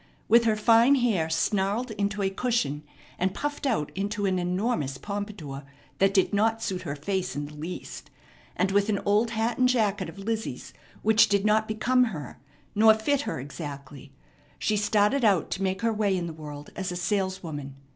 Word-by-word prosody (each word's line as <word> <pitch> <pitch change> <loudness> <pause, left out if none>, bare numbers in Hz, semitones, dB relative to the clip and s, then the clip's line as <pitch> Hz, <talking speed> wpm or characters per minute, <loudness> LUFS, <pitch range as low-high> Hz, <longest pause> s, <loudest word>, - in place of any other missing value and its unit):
With 235 +1 +5
her 220 -1 +3
fine 230 +5 +5
hair 215 -11 +1
snarled 200 +8 0
into 205 0 -2
a 195 - +1
cushion 195 - -1 0.4
and 185 +1 0
puffed 290 -1 -3
out 215 - 0
into 205 +1 -2
an 185 -1 +1
enormous 180 - -1
pompadour 200 -6 -6 0.4
that 195 0 +4
did 195 +1 +2
not 225 +2 +2
suit 185 -4 -2
her 150 -5 -4
face 185 +5 -2
in 145 0 -3
the 150 - -10
least, 160 +5 -7 0.5
and 190 +2 +1
with 200 +2 +2
an 205 - +2
old 210 +3 +3
hat 225 +1 -1
and 255 0 +4
jacket 215 -5 +1
of - - -12
Lizzie's 220 +2 -4 0.3
which 220 0 +5
did 200 0 +2
not 215 +1 +3
become 250 +4 +2
her 150 - -7 0.3
nor 220 +1 +6
fit 270 +6 0
her - - -3
exactly, 140 -1 -8 0.5
she 215 - 0
started 210 +5 +2
out 200 -6 +3
to 195 - -3
make 190 +3 -1
her 230 -1 +2
way 205 -3 +1
in 175 - -2
the 165 - -5
world 150 -2 -9
as 190 -1 -3
a - - -4
saleswoman. 175 -7 -3
200 Hz, 185 wpm, -27 LUFS, 175-220 Hz, 0.5 s, nor